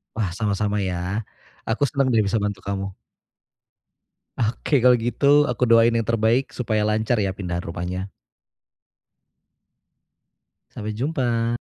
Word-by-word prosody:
Wah 110 -3 0
sama-sama 105 -1 -1
ya, 95 +4 -2 0.4
aku 115 +5 0
senang 135 0 0
deh 115 - +3
bisa 100 - 0
bantu 100 -1 -2
kamu. 95 0 -3 1.5
Oke 125 +5 +1
kalau 125 +1 +6
gitu, 140 +5 +3
aku 125 -2 -1
doain 115 0 +5
yang 115 -2 -1
terbaik 115 +3 +1
supaya 110 -3 0
lancar 110 +2 +1
ya 95 -1 -1
pindahan 90 -3 -3
rumahnya. 90 +3 -4 2.6
Sampai 105 0 -5
jumpa. 120 -3 -1
110 Hz, 120 wpm, -23 LUFS, 100-120 Hz, 2.6 s, kalau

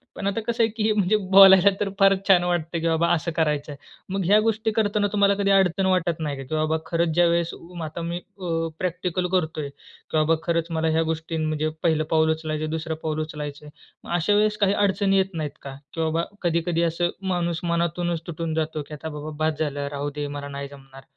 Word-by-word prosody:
पण 200 - -3
आता 200 +3 0
कसं 230 +1 0
आहे 225 - +2
की 220 - -2
हे 220 - +3
म्हणजे 205 0 +2 0.2
बोलायला 195 0 +9
तर 200 - 0
फारच 195 0 +5
छान 180 -2 +6
वाटत 175 -3 0
की 170 - 0
बाबा 165 +1 +2
असं 170 0 -1
करायचं 150 -2 0
आहे. 140 - -8 0.4
मग 195 - 0
ह्या 205 +4 +5
गोष्टी 220 0 0
करताना 210 -1 +1
तुम्हाला 200 -1 +3
कधी 200 0 +1
अडचण 190 -1 +3
वाटत 180 -3 +1
नाही 145 -3 -3
का? 135 - -6
की 155 +4 -4
बाबा, 155 +1 +1
खरंच 170 0 0
ज्यावेळेस 170 -1 +2
उ, 175 0 -10
आता 155 +2 -5
मी 170 +1 -3
अ, 175 -4 -4
प्रॅक्टिकल 180 0 -2
करतो 160 -4 0
आहे, 140 - -5
की 140 +2 -8
बाबा 155 +1 +3
खरंच 170 -1 0
मला 160 0 0
ह्या 165 - +3
गोष्टी 160 0 -4
म्हणजे 155 0 -1
पहिलं 160 -2 +2
पाऊल 160 0 +4
उचलायचं, 155 -1 -3
दुसरं 160 0 -3
पाऊल 155 -1 -2
उचलायचं 150 -1 -6
आहे. 150 - -11 0.3
मग - - -9
अशा 175 +4 +2
वेळेस 210 0 +2
काही 200 -1 +2
अडचणी 195 -1 +2
येत 190 -1 +1
नाहीत 150 -2 -4
का? 135 -1 -8 0.2
की 165 - -3
बाबा 160 +1 0 0.2
कधी-कधी 170 0 0
असं 175 +1 0 0.2
माणूस 170 -1 -1
मनातूनच 170 0 -1
तुटून 165 -1 -3
जातो, 155 -1 -2
की 150 - -10
आता 160 +2 -6
बाबा 150 +1 -6 0.2
बस 155 -1 -1
झालं, 145 -2 -2
राहू 145 0 -3
दे, 145 -1 -3
मला 140 - -6
नाही 140 0 -6
जमणार. 135 -1 -14
170 Hz, 220 wpm, -24 LUFS, 155-190 Hz, 0.4 s, बोलायला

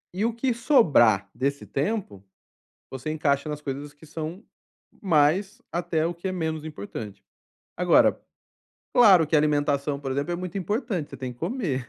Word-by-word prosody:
E 205 - 0
o 235 - +1
que 245 +1 0
sobrar 140 - +4
desse 140 +2 -2
tempo, 140 - -3 0.7
você 130 +3 -5
encaixa 150 -1 0
nas 150 0 -4
coisas 145 0 -5
que 145 +2 -17
são 160 +7 -6 0.6
mais, 190 - +2
até 170 -2 -1
o 175 - -1
que 170 +3 -6
é - - -1
menos 160 -3 -3
importante. 105 -7 -8 0.5
Agora, - - +4 0.7
claro 190 -9 +7
que 155 - -2
alimentação, 145 -1 +1
por 135 -2 -5
exemplo, 145 +6 -2
é - - -1
muito 185 +2 -5
importante, 205 - -2
você - - -9
tem 130 -2 -5
que 120 - -20
comer, 165 - -2
155 Hz, 160 wpm, -25 LUFS, 140-190 Hz, 0.7 s, claro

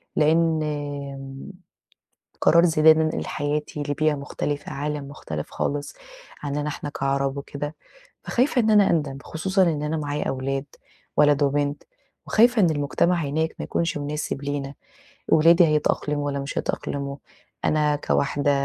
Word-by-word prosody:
لأن 160 +1 +3
آمم 140 -1 -5 0.9
قرار 170 +1 +5
زي 155 -3 +2
ده 160 - +9
إن 155 0 +5
أنا 155 0 +1
انقل - - -3
حياتي 150 0 -2
لبيئة 155 +1 +1
مختلفة، 145 0 -4
عالم 145 0 -3
مختلف 80 - -6
خالص 145 0 -3 0.5
عننا 145 +1 -2
إحنا 145 0 -5
كعرب 135 -1 -1
وكده، 145 +2 -5 0.5
فخايفة 250 0 +2
إن 220 -1 +2
أنا 205 -2 +5
أندم، 145 -4 0
خصوصًا 190 +4 0
إن 160 -5 +1
أنا 150 +2 -1
معايا 145 -1 -2
أولاد 135 +1 -2 0.5
ولد 145 -1 +4
وبنت، 145 +1 0 0.4
وخايفة 235 +1 +4
إن 170 - +4
المجتمع 155 +4 +1
هناك 160 +3 -1
ما - - -5
يكونش 165 -3 -1
مناسب 145 -1 -3
لينا، 140 -1 -3 0.5
ولادي 165 +2 +6
هيتأقلموا 150 -1 0
والّا 140 -1 -2
مش 140 +1 -4
هيتأقلموا؟ 140 0 -3 0.5
أنا 150 -1 +2
كواحدة 145 0 0
145 Hz, 140 wpm, -24 LUFS, 140-160 Hz, 0.9 s, ده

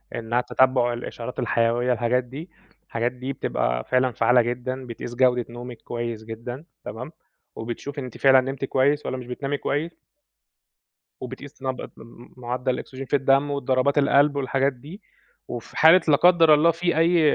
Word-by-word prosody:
إنّها 115 +1 -1
تتبُّع 125 -1 +2
الإشارات 120 +1 -6
الحيوية 120 +2 +1
الحاجات 125 +1 0
دي، 140 +8 -9 0.4
الحاجات 115 +1 -1
دي 130 +2 -6
بتبقى - - -1
فعلًا 130 - +1
فعّالة 120 +2 +3
جدًا 125 +2 -4
بتقيس 120 0 -7
جودة 125 -1 +3
نومِك 120 0 -9
كويس 120 -2 -5
جدًا 115 +5 -7 0.2
تمام؟ 120 +8 -7 0.4
وبتشوفي 130 +5 -6
أنتِ 125 -3 -8
فعلًا 135 -1 +6
نمتِ 135 +1 -4
كويس 140 +3 +1
والّا 130 - -3
مش 125 -1 -9
بتنامي 135 +3 -3
كويس. 155 +5 -3 1.2
وبتقيس 130 +3 -9
نبض 130 -1 -4
في - - -18 0.4
مُعدّل 125 +1 -2
الأكسجين 130 +1 -7
في 140 - 0
الدَم 135 +1 +2
والضربات 140 0 0
القلب 145 0 +4
والحاجات 135 0 0
دي، 150 - -12 0.5
وفي 120 -2 -8
حالة 165 +4 +7
لا 150 - +6
قدّر 165 -1 +6
الله 155 +3 +5
في 175 0 -1
أي 170 +2 +4
130 Hz, 155 wpm, -24 LUFS, 120-140 Hz, 1.2 s, حالة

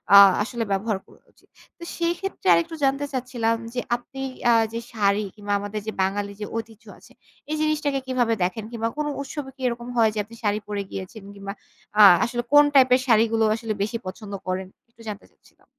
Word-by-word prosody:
আ - - +12 0.3
আসলে 235 0 -3
ব্যবহার 200 +1 0
করা - - -21
উচিত। - - -29 0.3
তো 340 - -11
সেই 340 0 +1
ক্ষেত্রে 390 - -5
আরেকটু 170 - +1
জানতে 275 +1 +2
চাচ্ছিলাম 240 -3 0 0.2
যে, 250 - -1 0.2
আপনি 270 +2 -9 0.3
আ - - +6 0.2
যে 230 - -2
শাড়ি, 205 -1 +1
কিংবা 205 -1 -3
আমাদের 205 +1 -4
যে - - -1
বাঙালি 200 +1 -1
যে - - -2
ঐতিহ্য 225 -1 -8
আছে, - - -19 0.4
এই - - +1
জিনিসটাকে 295 -3 0
কিভাবে 245 -3 +1
দেখেন? 185 +4 -2
কিংবা 230 -1 -2
কোন 300 - -1 0.2
উৎসবে 280 0 -6
কি 265 - -16
এরকম 240 0 -4
হয় 225 -1 +5
যে, 215 - -3
আপনি 230 +3 -14
শাড়ি 210 0 +1
পরে 205 -1 -2
গিয়েছেন? 195 +2 -7
কিংবা 200 0 -6 0.5
আ - - +10 0.2
আসলে 240 0 -3
কোন 290 0 +9
টাইপ 260 -1 +7
এর 255 - 0
শাড়িগুলো 225 -1 +4
আসলে 225 -1 -3
বেশি 230 +3 -2
পছন্দ 200 +1 -7
করেন? 185 0 -2 0.2
একটু 230 0 -20
জানতে 205 -1 -7
চাচ্ছিলাম। - - -27
225 Hz, 200 wpm, -24 LUFS, 205-255 Hz, 0.5 s, আ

